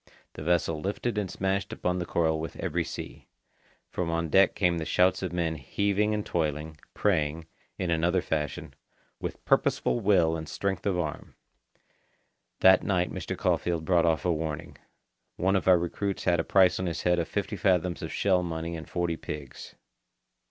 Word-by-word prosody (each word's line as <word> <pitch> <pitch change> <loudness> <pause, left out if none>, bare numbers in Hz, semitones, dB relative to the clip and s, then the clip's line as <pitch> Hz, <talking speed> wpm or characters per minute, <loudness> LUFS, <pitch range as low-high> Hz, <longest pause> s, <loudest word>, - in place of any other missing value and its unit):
The - - -9
vessel 80 -1 +1
lifted 105 +5 -2
and 100 -3 -3
smashed 95 +1 -1
upon 90 0 -1
the 90 - -3
coral 80 -2 +1
with 80 - -5
every - - -1
sea. - - -8 0.6
From 90 -2 -2
on 85 0 -1
deck 95 +5 +5
came 90 -3 +2
the - - -2
shouts 90 +2 +3
of 95 - -3
men 85 -2 -1
heaving 100 - 0
and 105 - -3
toiling, 75 -1 -2 0.2
praying, 80 -5 0 0.3
in 90 -2 -1
another 85 +3 +2
fashion, 75 -2 -3 0.5
with - - -6
purposeful - - +2
will 90 -6 +3
and 80 -1 -6
strength 100 0 -2
of 95 -3 +1
arm. 80 -4 -4 1.3
That 95 0 +7
night 90 -2 0
Mr. - - -5
Caulfeild 85 -2 0
brought 85 -1 +3
off 80 +1 +1
a 90 - +3
warning. 80 0 -4 0.6
One 95 +2 +1
of 95 - 0
our 90 -1 +7
recruits 95 +3 -3
had 85 -1 +2
a - - +1
price 95 0 +4
on 95 - -1
his 85 - -3
head 90 0 +3
of 85 - -1
fifty 105 +1 -3
fathoms 90 -3 +1
of 80 - -5
shell 95 -2 +2
money 85 -1 -4
and 80 - -8
forty 85 -2 -1
pigs. 75 -4 -8
85 Hz, 175 wpm, -28 LUFS, 80-95 Hz, 1.3 s, That